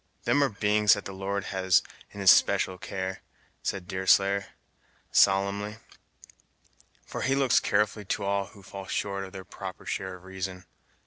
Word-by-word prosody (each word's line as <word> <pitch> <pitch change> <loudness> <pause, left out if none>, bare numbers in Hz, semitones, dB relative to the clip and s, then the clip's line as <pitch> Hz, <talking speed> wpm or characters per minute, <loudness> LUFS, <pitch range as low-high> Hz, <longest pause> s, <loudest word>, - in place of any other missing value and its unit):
"Them 145 - +3
are 140 - +2
beings 105 -1 +3
that 100 - -7
the 95 - -6
Lord 100 +1 -3
has 95 -1 +3 0.3
in 100 - -8
his 95 - +9
special 95 -1 +3
care," 95 0 -4 0.4
said 95 -3 -3
Deerslayer, 95 +1 +2 0.6
solemnly; 100 +2 +3 1.3
"for - - -6
he 135 - +1
looks 135 -3 +4
carefully 105 0 0
to 95 - -2
all 100 0 0
who 100 0 -16
fall 95 0 -9
short 100 -1 -2
of 95 - -11
their 95 -1 -9
proper 95 -1 -8
share 95 -1 -3
of 90 - -15
reason. 95 0 -6
100 Hz, 155 wpm, -28 LUFS, 95-100 Hz, 1.3 s, his